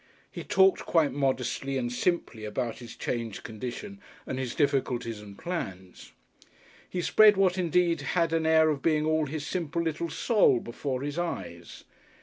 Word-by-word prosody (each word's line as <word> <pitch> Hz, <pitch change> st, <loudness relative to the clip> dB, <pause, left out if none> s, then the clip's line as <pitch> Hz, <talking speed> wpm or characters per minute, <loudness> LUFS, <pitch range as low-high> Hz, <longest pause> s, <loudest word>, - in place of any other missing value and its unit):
He -, -, -7 dB
talked 190 Hz, 0 st, +4 dB
quite 160 Hz, -5 st, +3 dB
modestly 135 Hz, 0 st, -1 dB
and 120 Hz, -2 st, -2 dB
simply 125 Hz, -7 st, -1 dB
about 115 Hz, +1 st, -3 dB
his 120 Hz, -2 st, -10 dB
changed 115 Hz, -4 st, -4 dB
condition 125 Hz, -, -7 dB, 0.2 s
and 130 Hz, -, -4 dB
his 125 Hz, -3 st, -3 dB
difficulties 125 Hz, -6 st, 0 dB
and 100 Hz, -1 st, -12 dB
plans. 95 Hz, -, -6 dB, 0.8 s
He 180 Hz, -1 st, -3 dB
spread 215 Hz, +1 st, +6 dB
what 190 Hz, -2 st, +3 dB
indeed 175 Hz, -1 st, +1 dB
had 165 Hz, -2 st, 0 dB
an 160 Hz, -1 st, +1 dB
air 160 Hz, -1 st, +5 dB
of 140 Hz, -2 st, -3 dB
being 155 Hz, -1 st, +2 dB
all 155 Hz, -1 st, +1 dB
his 150 Hz, +1 st, -4 dB
simple 170 Hz, -2 st, -2 dB
little 165 Hz, +1 st, -2 dB
soul 210 Hz, -, +3 dB
before 130 Hz, +3 st, -4 dB
his 145 Hz, +3 st, -3 dB
eyes. 85 Hz, -, -5 dB
145 Hz, 155 wpm, -28 LUFS, 120-170 Hz, 0.8 s, spread